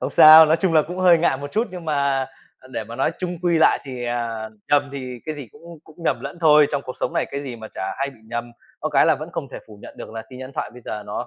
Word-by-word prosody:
Không -, -, -3 dB
sao, 155 Hz, +1 st, +9 dB
nói 160 Hz, +2 st, +3 dB
chung 175 Hz, 0 st, 0 dB
là 155 Hz, -2 st, +5 dB
cũng 180 Hz, +4 st, -7 dB
hơi 180 Hz, -2 st, +5 dB
ngại 160 Hz, -5 st, +2 dB
một 145 Hz, +1 st, -8 dB
chút 225 Hz, +4 st, 0 dB
nhưng 180 Hz, -2 st, -8 dB
mà, 140 Hz, -3 st, 0 dB, 0.3 s
à, 130 Hz, -, -18 dB
để 110 Hz, -, -3 dB
mà 115 Hz, +2 st, -9 dB
nói 135 Hz, +4 st, 0 dB
chung 180 Hz, -2 st, -4 dB
quy 170 Hz, -2 st, +2 dB
lại 160 Hz, -, +4 dB
thì, 130 Hz, -3 st, -6 dB
à, 115 Hz, -2 st, -3 dB, 0.2 s
nhầm 145 Hz, -1 st, +3 dB
thì 130 Hz, -3 st, -7 dB
cái 155 Hz, -, -3 dB
gì 140 Hz, -5 st, -9 dB
cũng 170 Hz, -1 st, -13 dB
cũng 155 Hz, -, -18 dB
nhầm -, -, 0 dB
lẫn 175 Hz, -, -7 dB
thôi, 150 Hz, -2 st, +6 dB
trong 140 Hz, -, -1 dB
cuộc 130 Hz, -, -7 dB
sống -, -, -1 dB
này -, -, 0 dB
cái 140 Hz, +1 st, -4 dB
gì 130 Hz, -4 st, -7 dB
mà 110 Hz, -1 st, -9 dB
chả 95 Hz, -, -4 dB
hay 140 Hz, +1 st, -1 dB
bị 120 Hz, -, -19 dB
nhầm. 120 Hz, +1 st, -5 dB, 0.3 s
Có -, -, -1 dB
cái -, -, +4 dB
là -, -, +5 dB
vẫn -, -, -7 dB
không -, -, -5 dB
thể -, -, -6 dB
phủ 105 Hz, -2 st, -13 dB
nhận -, -, -12 dB
được -, -, -9 dB
là 110 Hz, 0 st, -6 dB
tin 130 Hz, -, -10 dB
nhắn 130 Hz, +1 st, -8 dB
thoại -, -, -3 dB
bây 125 Hz, -, -14 dB
giờ 105 Hz, -1 st, -5 dB
nó 105 Hz, +4 st, -4 dB
140 Hz, 305 wpm, -22 LUFS, 120-160 Hz, 0.3 s, sao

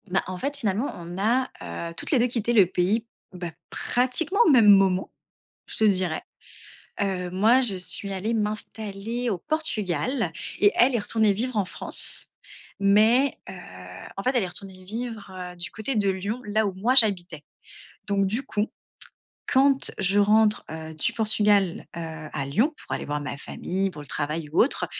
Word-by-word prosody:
Bah, 190 Hz, +1 st, +2 dB
en 185 Hz, 0 st, -4 dB
fait, 280 Hz, +8 st, -2 dB
finalement, 220 Hz, +1 st, 0 dB
on 175 Hz, +1 st, -8 dB
a, 240 Hz, +6 st, +2 dB, 0.4 s
heu, -, -, -9 dB
toutes -, -, -4 dB
les 275 Hz, -, +4 dB
2 240 Hz, -, +3 dB
quitté 235 Hz, -1 st, -1 dB
le 205 Hz, -5 st, +7 dB
pays, 190 Hz, +6 st, 0 dB, 0.3 s
bah, 175 Hz, -2 st, -5 dB, 0.2 s
pratiquement 260 Hz, +10 st, 0 dB
au -, -, +5 dB
même 240 Hz, -7 st, +6 dB
moment, 195 Hz, -2 st, +4 dB, 0.6 s
je -, -, -3 dB
te 220 Hz, -, +3 dB
dirais. 185 Hz, -6 st, +2 dB, 0.8 s
Heu, 185 Hz, -3 st, -1 dB
moi, 220 Hz, +8 st, +4 dB
je 225 Hz, -7 st, -1 dB
suis 185 Hz, +2 st, -2 dB
allée 200 Hz, +4 st, -2 dB
m'installer 215 Hz, +2 st, -3 dB
au 200 Hz, -, -1 dB
Portugal 220 Hz, -, -1 dB, 0.3 s
et 205 Hz, -, +5 dB
elle 250 Hz, +1 st, +4 dB
est -, -, +2 dB
retournée 215 Hz, 0 st, +2 dB
vivre 235 Hz, +3 st, -1 dB
en 200 Hz, -, +2 dB
France. -, -, -2 dB, 0.5 s
Mais 220 Hz, +7 st, +4 dB
heu, -, -, -6 dB, 0.6 s
en 195 Hz, -, -5 dB
fait, 255 Hz, -, +2 dB
elle 240 Hz, -, +3 dB
est -, -, -2 dB
retournée 185 Hz, +1 st, -8 dB
vivre, 225 Hz, -1 st, -5 dB
heu, 180 Hz, -1 st, -7 dB
du 175 Hz, -, -5 dB
côté 230 Hz, +4 st, -3 dB
de 205 Hz, -2 st, +2 dB
Lyon, 200 Hz, +6 st, -3 dB
là 215 Hz, +1 st, +1 dB
où 195 Hz, -, -3 dB
moi 225 Hz, +8 st, +1 dB
j'habitais. 185 Hz, -, +4 dB, 0.6 s
Donc 200 Hz, -1 st, +2 dB
du 225 Hz, +7 st, -2 dB
coup, 210 Hz, -3 st, -1 dB, 0.8 s
quand 275 Hz, +1 st, +3 dB
je 195 Hz, +1 st, +1 dB
rentre, 210 Hz, +1 st, +4 dB
heu, 160 Hz, 0 st, -7 dB
du 155 Hz, -, -1 dB
Portugal, 210 Hz, -4 st, +2 dB, 0.2 s
heu, -, -, -4 dB, 0.3 s
à 140 Hz, -3 st, -3 dB
Lyon 225 Hz, -, +2 dB
pour -, -, -10 dB
aller -, -, -4 dB
voir 150 Hz, 0 st, -3 dB
ma 145 Hz, -1 st, -5 dB
famille, 190 Hz, +6 st, -3 dB
pour 150 Hz, -, -10 dB
le -, -, -13 dB
travail 150 Hz, +2 st, -3 dB
ou 160 Hz, -, +2 dB
autre 265 Hz, -, +1 dB
205 Hz, 180 wpm, -25 LUFS, 185-230 Hz, 0.8 s, le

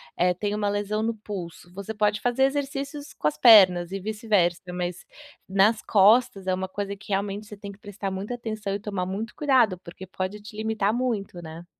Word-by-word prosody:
eh, 180 Hz, 0 st, +2 dB
tem 205 Hz, +2 st, -2 dB
uma 210 Hz, -1 st, 0 dB
lesão 205 Hz, +1 st, -1 dB
no 225 Hz, 0 st, -1 dB
pulso, 180 Hz, -4 st, -8 dB
você 200 Hz, +3 st, -6 dB
pode 210 Hz, 0 st, +1 dB
fazer 245 Hz, +2 st, +1 dB
exercícios 280 Hz, +1 st, -2 dB
com 150 Hz, -, -1 dB
as 150 Hz, 0 st, -1 dB
pernas 185 Hz, -5 st, +7 dB
e 195 Hz, -, -3 dB
vice-versa, 205 Hz, -4 st, 0 dB
mas 180 Hz, 0 st, -4 dB, 0.5 s
nas 200 Hz, +3 st, +3 dB
costas 210 Hz, 0 st, +4 dB
é 185 Hz, -, +1 dB
uma 190 Hz, 0 st, -2 dB
coisa 200 Hz, +1 st, -4 dB
que 195 Hz, -, -16 dB
realmente 200 Hz, +2 st, -2 dB
você 210 Hz, -1 st, -10 dB
tem 200 Hz, 0 st, -8 dB
que 200 Hz, -, -16 dB
prestar 205 Hz, -1 st, -5 dB
muita 200 Hz, +6 st, -4 dB
atenção 215 Hz, -4 st, -4 dB
e 205 Hz, -, -3 dB
tomar 200 Hz, -3 st, -3 dB
muito 210 Hz, +5 st, -4 dB
cuidado, 245 Hz, -11 st, +2 dB
porque 185 Hz, +2 st, -11 dB
pode 185 Hz, +3 st, -4 dB
te 210 Hz, +1 st, -12 dB
limitar 220 Hz, -1 st, 0 dB
muito, 225 Hz, -8 st, -2 dB
né? 165 Hz, +1 st, -9 dB
205 Hz, 200 wpm, -25 LUFS, 190-220 Hz, 0.5 s, pernas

